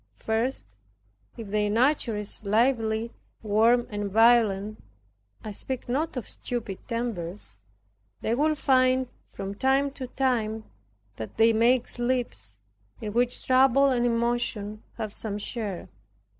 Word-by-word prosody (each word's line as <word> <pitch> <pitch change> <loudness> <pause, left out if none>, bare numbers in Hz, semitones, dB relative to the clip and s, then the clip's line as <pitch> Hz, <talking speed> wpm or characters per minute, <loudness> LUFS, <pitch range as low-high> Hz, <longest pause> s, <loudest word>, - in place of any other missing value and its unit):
First, 225 - -1 0.7
if 225 -4 -7
their 210 0 +1
nature 235 0 +2
is 210 +1 -2
lively, 225 +1 +1 0.3
warm 225 +3 +3
and 205 -1 -3
violent, 215 -1 +3 0.6
(I 215 - -5
speak 255 +5 -5
not 280 +4 -1
of 245 - -4
stupid 225 -6 -5
tempers) 205 - -4 0.6
they 225 - 0
will 305 +5 +2
find, 255 -2 +3 0.2
from 195 0 -5
time 270 +5 +2
to 260 -2 -7
time, 230 -5 -1 0.5
that 110 - -7
they 225 +1 +5
make 235 +2 +3
slips, 240 - -2 0.4
in 210 - -5
which 245 +1 0
trouble 265 +1 +5
and 245 -2 +1
emotion 230 -3 -1 0.2
have 215 -3 -4
some 210 -2 -4
share. 205 -3 -4
230 Hz, 125 wpm, -27 LUFS, 210-255 Hz, 0.7 s, they